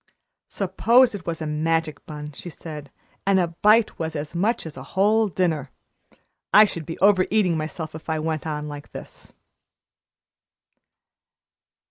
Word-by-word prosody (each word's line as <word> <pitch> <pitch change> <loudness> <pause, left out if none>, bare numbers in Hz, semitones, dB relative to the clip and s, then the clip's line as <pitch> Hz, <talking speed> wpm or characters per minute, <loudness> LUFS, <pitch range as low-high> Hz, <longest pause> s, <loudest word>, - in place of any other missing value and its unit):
"Suppose 230 +6 +3
it 200 -3 -8
was 165 -1 -3
a - - -3
magic 155 0 -1
bun," 150 -1 -7
she 165 +5 -9
said, 150 -3 -9 0.4
"and 195 -1 +4
a 175 -2 +1
bite 210 +6 +3
was 160 -1 -3
as 150 +2 -5
much 210 +6 0
as 160 - -8
a - - -8 0.2
whole 215 +3 +4
dinner. 160 -6 -1 0.8
I 215 - +8
should 170 -6 -5
be 165 - -5
over 195 -2 +5
eating 200 -6 +2
myself 155 0 -4
if 160 +1 -9
I 160 - 0
went 155 0 -3
on 150 -1 -3
like 145 -1 -9
this." - - -11
165 Hz, 150 wpm, -23 LUFS, 155-195 Hz, 0.8 s, I